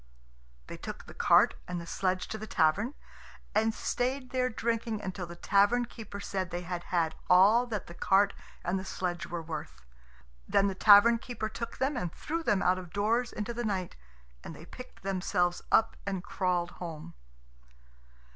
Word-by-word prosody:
They - - -8
took - - -7
the - - -11
cart - - +5
and 180 -1 -3
the 170 - -7
sledge 185 +1 -1
to 220 - -4
the 220 - -7
tavern, 195 - +2 0.6
and 220 +1 +3
stayed 255 +3 -2
there 255 -1 +1
drinking 230 -1 -2
until 185 -3 -5
the 170 - -9
tavern 205 +7 +3
keeper 220 -4 -9
said 190 -2 -3
they 175 0 -4
had 175 0 -5
had 165 -3 0 0.2
all 205 +7 +6
that 215 -4 -3
the 170 - -10
cart 195 +3 +3 0.3
and 185 +2 0
the - - -6
sledge 175 -3 -3
were 170 -1 -4
worth. 150 - -7 0.6
Then 200 - +3
the 195 - 0
tavern 210 +4 +7
keeper 235 -2 -4
took 230 +2 -6
them 270 +3 0
and 180 -9 -2
threw 330 - -4
them 210 - +1
out 185 +1 +3
of 180 -3 -10
doors 225 +5 +1
into 215 +3 -4
the 240 +1 -3
night, 190 -5 -2 0.5
and 160 - -8
they 160 - -12
picked 250 +7 -12
themselves 180 -2 0
up 225 - +4
and 190 -3 -2
crawled 180 -2 -1
home. 165 -1 -7
195 Hz, 175 wpm, -30 LUFS, 175-230 Hz, 0.6 s, tavern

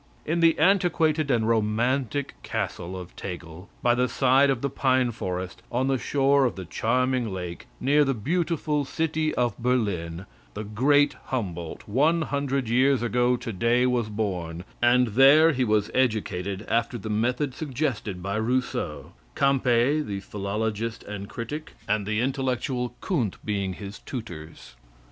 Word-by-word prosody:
In 165 +3 0
the 165 -1 +4
antiquated 160 -4 +2
and 115 -4 +2
romantic 120 +5 0
castle 90 +2 -4
of 90 -1 -11
Tegel, 90 -1 -8
by 120 - +4
the 125 +1 +1
side 135 +1 +4
of 135 -2 0
the 140 - +1
pine 130 -3 +2
forest, 90 -3 -5
on 130 +3 0
the 135 -2 +1
shore 140 0 +3
of 120 - -1
the 95 - -7
charming 125 +4 0
lake, 90 -2 -6
near 145 +3 +4
the 135 -2 0
beautiful 155 - 0
city 155 +2 -1
of 120 -1 +1
Berlin, 100 -8 -1 0.3
the 105 - -4
great 140 +8 +3
Humboldt, 90 - -4
one 155 +10 +2
hundred 140 -3 -1
years 130 +1 +3
ago 120 +1 +2
to 120 -2 -6
day, 120 +6 +2
was 120 -3 +1
born, 90 -6 -3 0.2
and 120 0 +4
there 140 +8 +6
he 130 -3 0
was 105 -3 +1
educated 105 -5 -1
after 115 +1 0
the 110 - -7
method 125 +5 0
suggested 125 - -3
by 100 +2 -2
Rousseau 110 - -2 0.2
Campe, 135 +1 +3
the 100 -5 -4
philologist 105 +3 -3
and 100 -1 -7
critic, 145 +6 -6
and 105 -1 0
the 110 +1 0
intellectual 130 -1 -1
Kunth 125 - -1
being 100 -3 -1
his 100 +2 -8
tutors. 80 - -8
120 Hz, 150 wpm, -26 LUFS, 105-135 Hz, 0.3 s, there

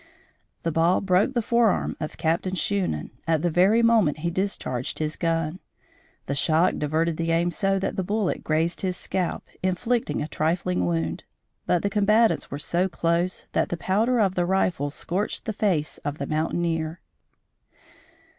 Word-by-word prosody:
The 165 - 0
ball 165 +3 +3
broke 195 +7 +2
the 235 - +1
forearm 235 -3 +2
of 155 - -5
Captain 165 +3 0
Shunan, 185 - -1 0.2
at 160 -1 +1
the 175 - +1
very 195 +8 +4
moment 225 -11 +4
he 170 - +1
discharged 170 -9 -2
his 155 0 -2
gun. 165 0 -1 0.7
The 140 - -2
shock 160 +5 +2
diverted 155 +2 0
the 165 0 -1
aim 170 +1 +2
so 195 +2 +1
that 190 - -2
the 190 - 0
bullet 205 +1 -1
grazed 160 +2 0
his 185 -2 -1
scalp, 185 -2 -3
inflicting 225 +6 0
a 150 - -2
trifling 155 - 0
wound; 80 -1 -1 0.4
but 175 - +2
the 200 - +1
combatants 215 +2 +3
were 140 - -4
so 175 +5 0
close 170 +1 0
that - - +1
the 175 - -2
powder 220 +8 +1
of 195 -4 +3
the 175 -1 0
rifle 180 -6 +1
scorched 180 +7 -3
the 220 - -2
face 180 -8 0
of 145 0 -4
the 140 - -3
mountaineer. 160 +1 -1
175 Hz, 165 wpm, -25 LUFS, 155-195 Hz, 0.7 s, very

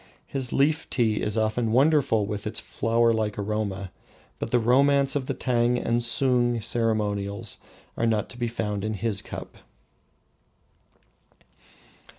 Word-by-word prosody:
His 130 -3 -3
Leaf 145 +3 +1
tea 110 -4 +1
is 105 +1 -1
often 110 +1 0
wonderful 130 -4 +3
with 105 0 -4
its 110 - -3
flower 115 0 +1
like 110 -2 -1
aroma, 100 -2 -3 0.5
but - - -3
the 125 - +3
romance 135 +4 +3
of 135 -2 -2
the - - -2
Tang 120 -1 +1
and 120 0 0
Sung 120 0 +2
ceremonials 105 -3 -1 0.4
are 115 - 0
not 110 -2 +1
to 125 - -11
be 120 - 0
found 105 -3 -3
in 110 0 -2
his 105 0 0
cup. - - -9
115 Hz, 140 wpm, -25 LUFS, 105-125 Hz, 0.5 s, wonderful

